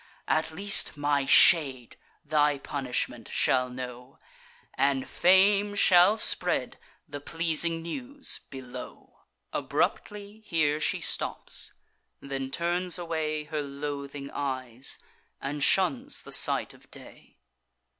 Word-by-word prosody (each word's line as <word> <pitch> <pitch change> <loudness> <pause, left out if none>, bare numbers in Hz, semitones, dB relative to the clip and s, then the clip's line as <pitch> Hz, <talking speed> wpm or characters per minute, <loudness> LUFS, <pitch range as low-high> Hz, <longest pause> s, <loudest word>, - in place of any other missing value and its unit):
At 160 +1 +1
least 195 -1 +1
my 145 -1 +1
shade 135 -6 +5 0.3
thy 150 -2 +2
punishment 125 -4 -4
shall 125 -1 +2
know, 125 +1 -8 0.6
And 135 -1 +1
Fame 200 +3 +4
shall 190 +2 +5
spread - - 0 0.3
the 145 -2 -7
pleasing 165 +1 -1
news 265 - -4
below." 130 -2 -10 0.3
Abruptly 205 +1 -2
here 155 -6 +1
she - - 0
stops; - - -1 0.5
then 135 -1 -5
turns 175 +4 -1
away 160 -3 -2
Her 150 0 -4
loathing 140 0 -6
eyes, 130 -3 -3 0.4
and 140 +1 -3
shuns 250 - +1
the - - -11
sight - - +3
of - - -20
day. - - -14
150 Hz, 105 wpm, -28 LUFS, 135-175 Hz, 0.6 s, shade